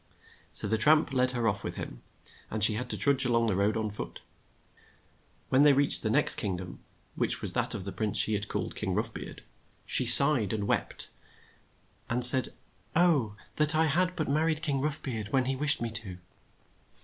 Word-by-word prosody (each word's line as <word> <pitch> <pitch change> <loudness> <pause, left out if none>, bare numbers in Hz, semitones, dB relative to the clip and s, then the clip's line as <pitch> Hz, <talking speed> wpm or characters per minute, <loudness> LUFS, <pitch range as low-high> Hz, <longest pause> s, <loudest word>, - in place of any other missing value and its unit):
So - - -1
the 110 +1 -3
tramp 150 +3 +1
led 125 -1 -1
her 120 -2 -4
off 100 -2 -4
with - - -8
him, - - -11 0.5
and 110 -1 -6
she 110 - +5
had 120 +4 -7
to - - -5
trudge 140 -2 +1
a 125 - -2
long 115 0 -1
the 105 -4 -3
road 100 +3 -2
on 110 -1 -5
foot. 105 - -6 1.3
When 130 - 0
they 145 -1 +3
reached 140 +1 +3
the 110 - -4
next 110 - +2
king 95 -3 -5
dom, 90 0 -12 0.3
which - - -4
was - - -7
that - - -4
of - - -7
the 100 - -7
prince 105 0 -5
she 110 - +2
had 105 0 -5
called - - -6
King - - -6
Rough - - -4
Beard, - - -12 0.4
she 125 - +1
sighed 125 -5 +8
and 105 -2 -5
wept, - - -5 1.0
and 120 +1 +6
said, 130 0 +9 0.4
"Oh 155 -11 -1 0.2
that 150 +1 +3
I 160 +1 0
had 180 +4 -3
but 155 -4 -5
mar 155 +3 -2
ried 160 -1 -4
King 140 -4 -3
Rough 150 +1 -4
Beard 110 -6 -7
when 130 +3 -3
he 135 +1 -4
wished 145 -1 0
me 115 - -6
to!" 105 -5 -9
125 Hz, 210 wpm, -25 LUFS, 110-145 Hz, 1.3 s, said